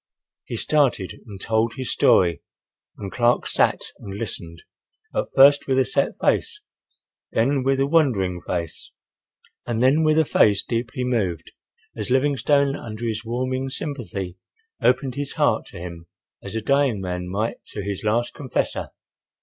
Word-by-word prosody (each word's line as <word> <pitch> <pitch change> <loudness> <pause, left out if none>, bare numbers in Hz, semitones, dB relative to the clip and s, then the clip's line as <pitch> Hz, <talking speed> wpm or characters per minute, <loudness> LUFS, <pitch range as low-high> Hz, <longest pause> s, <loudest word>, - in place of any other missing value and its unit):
He - - -5
started 135 -11 0
and 100 -3 -9
told 110 +2 0
his 130 -1 -3
story 85 -5 +4 0.6
and 100 -2 -6
Clark 120 0 +2
sat - - +2 0.2
and 100 -1 -8
listened, 85 -6 -7 0.5
at - - -1
first 140 +1 +7
with 130 -1 +2
a 130 - +4
set - - 0
face, 420 - +1 0.7
then 135 +5 +2
with 135 0 +2
a 135 - +3
wondering 115 - +2
face, 85 -2 -4 0.8
and 120 0 0
then 140 +5 +4
with 155 0 +3
a 160 - +4
face 105 -6 +4
deeply 120 +3 -3
moved, 100 -10 -1 0.4
as - - -4
Livingstone, 140 +1 +2
under 115 -2 -6
his 110 -1 -2
warming 130 +3 -2
sympathy, 110 - -5 0.4
opened 130 +1 +2
his 140 +1 -4
heart - - +1
to - - -11
him 85 -1 -8 0.3
as - - -8
a 110 - -1
dying 140 -4 +2
man 90 -1 -4
might 105 +5 -2
to 105 - -6
his 100 -1 -4
last 120 +3 0
confessor. 130 -4 -2
120 Hz, 150 wpm, -23 LUFS, 100-135 Hz, 0.8 s, first